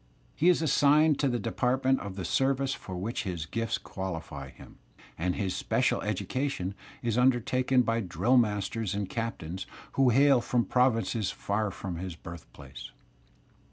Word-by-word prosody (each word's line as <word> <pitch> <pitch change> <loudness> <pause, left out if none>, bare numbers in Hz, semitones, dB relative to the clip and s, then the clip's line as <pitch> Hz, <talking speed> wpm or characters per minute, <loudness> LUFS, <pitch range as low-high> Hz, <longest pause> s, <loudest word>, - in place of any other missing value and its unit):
He 170 - +4
is 175 -2 +3
assigned 150 0 +4
to 140 - +2
the 120 -2 0
department 130 +3 +1
of 100 -2 -7
the 95 -3 -4
service 135 +5 +1
for 95 - -7
which 105 +7 -3
his 90 -6 -4
gifts 115 +5 -2
qualify 80 -8 -6
him, 65 - -15 0.4
and 90 +2 -1
his 95 -3 -2
special - - +1
education 130 -9 -2 0.3
is 115 -1 0
imdertaken 125 0 +3
by 115 0 +1
drill 115 +5 +1
masters 105 -2 0
and 100 -1 -2
captains 95 -5 -4 0.2
who 135 -2 +3
hail 135 +1 +5
from 120 0 0
provinces 115 -4 +1
far 105 +1 -1
from 95 -2 -6
his 90 -1 -5
birthplace. 70 -6 -10
115 Hz, 150 wpm, -29 LUFS, 95-130 Hz, 0.4 s, hail